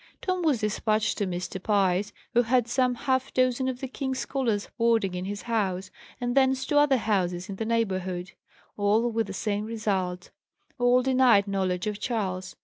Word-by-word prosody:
Tom 370 -1 -1
was 295 -9 +1
despatched 215 +1 0
to 205 - 0
Mr. 180 +1 -4
Pye's, 200 -1 +1 0.2
who 240 - +5
had 245 0 +2
some 250 +1 +1
half 260 +1 -1
dozen 255 0 +2
of 255 0 -3
the 265 - -3
king's 265 0 -3
scholars 240 -7 -1
boarding 230 -5 +2
in 180 0 -4
his 205 +1 -5
house; 195 -5 -1 0.3
and 245 0 -2
thence 265 -1 +3
to 290 +1 +3
other 285 -2 +4
houses 185 -4 -1
in 195 - -6
the 225 - -2
neighbourhood. 190 -5 -1 0.5
All 215 +4 +2
with 225 -1 -1
the 195 - -6
same 205 +1 -2
result; 195 -5 -2 0.5
all 245 +1 +4
denied 255 -6 +4
knowledge 190 -2 -1
of 210 -1 -3
Charles. 190 -6 -3
220 Hz, 175 wpm, -27 LUFS, 195-250 Hz, 0.5 s, who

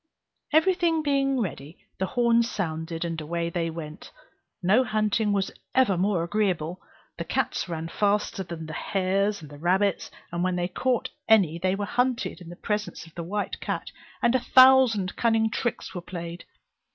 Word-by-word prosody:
Every 320 +5 +5
thing 335 -3 +1
being 275 -2 +1
ready, 160 -5 -5 0.2
the 190 - 0
horns 235 0 +2
sounded, 165 -3 -3
and 165 -1 -3
away 170 +2 -2
they 170 -1 -1
went; 160 -2 -8 0.5
no 210 +8 +4
hunting 215 -1 +1
was 195 -1 0 0.2
ever 255 -8 +4
more 180 -1 +1
agreeable; 180 -3 -1 0.4
the - - -1
cats - - -1
ran 165 -1 -4
faster 205 +2 0
than 170 -3 -6
the 155 - -7
hares 195 +1 0
and 145 -1 -11
rabbits; 190 +3 +1 0.2
and 170 +1 -2
when 185 0 +1
they 175 0 0
caught 250 +5 -1 0.2
any 185 -7 +4
they 185 +2 +1
were 205 +1 -2
hunted 250 -4 -1
in 170 - -10
the 175 - -8
presence 210 -2 -3
of 165 - -17
the 170 - -5
white 200 +5 -3
cat, - - -4 0.3
and 235 - +4
a 260 - +3
thousand 255 -7 +5
cunning 225 -1 +2
tricks 220 -3 -3
were 180 - -5
played. 170 -1 -7
195 Hz, 170 wpm, -26 LUFS, 170-225 Hz, 0.5 s, Every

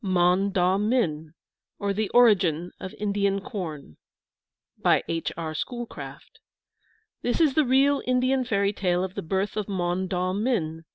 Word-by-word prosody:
MON 185 +1 +2
DAW 185 0 +2
MIN, 170 -9 0 0.4
OR 200 0 -1
THE 215 +1 -1
ORIGIN 185 -8 +3
OF 185 - -7
INDIAN 200 -1 0
CORN 155 - -7 0.8
BY - - +3
H. 165 0 -2
R. 160 -2 -4
SCHOOLCRAFT. 240 +8 -7 0.8
This 245 - -1
is 310 -5 +4
the 310 - +3
real 275 +2 +3
Indian 255 +1 +2
fairy 200 -4 0
tale 180 -2 0
of 190 -1 -4
the - - -4
birth 190 +5 -2
of 210 -2 -2
Mon 185 -1 -1
daw 185 0 -1
min. 180 -8 -1
195 Hz, 150 wpm, -25 LUFS, 175-230 Hz, 0.8 s, is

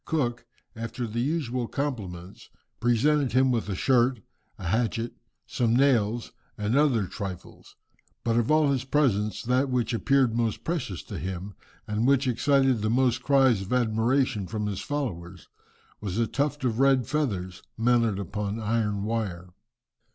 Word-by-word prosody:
Cook, 125 -7 -1 0.3
after 115 +2 -4
the 115 +1 -4
usual 130 -4 -1
compliments, 100 -12 -5 0.3
presented 130 +3 +2
him 130 +1 +4
with 115 -3 -1
a 100 - -1
shirt, 125 +1 +2 0.4
a 95 - -8
hatchet, 115 +2 0 0.3
some 115 -2 0
nails, 120 -4 +2 0.3
and 105 +3 -1
other 135 -8 +3
trifles. 95 -1 -8 0.5
But 115 -1 +1
of 120 -1 +1
all 155 -2 +4
his 130 -3 0
presents, 125 -7 +1
that 130 +3 +1
which 125 -2 0
appeared 130 0 +2
most 115 -2 -1
precious 155 - -3
to - - -7
him, 95 +4 -5 0.3
and 105 +3 0
which 140 0 +3
excited 135 -1 +2
most 120 +2 +2
cries 135 -7 +4
of 95 - -7
admiration 115 -2 +1
from 105 0 -3
his 100 -2 -3
followers, 95 - -5 0.5
was 100 -2 -4
a 115 - +2
tuft 145 +4 -2
of 120 -2 0
red 135 -2 +4
feathers 100 -12 -2 0.2
mounted 115 -3 +2
upon 100 +2 -3
iron 105 -2 -1
wire. 95 -6 -3
115 Hz, 145 wpm, -27 LUFS, 105-135 Hz, 0.5 s, him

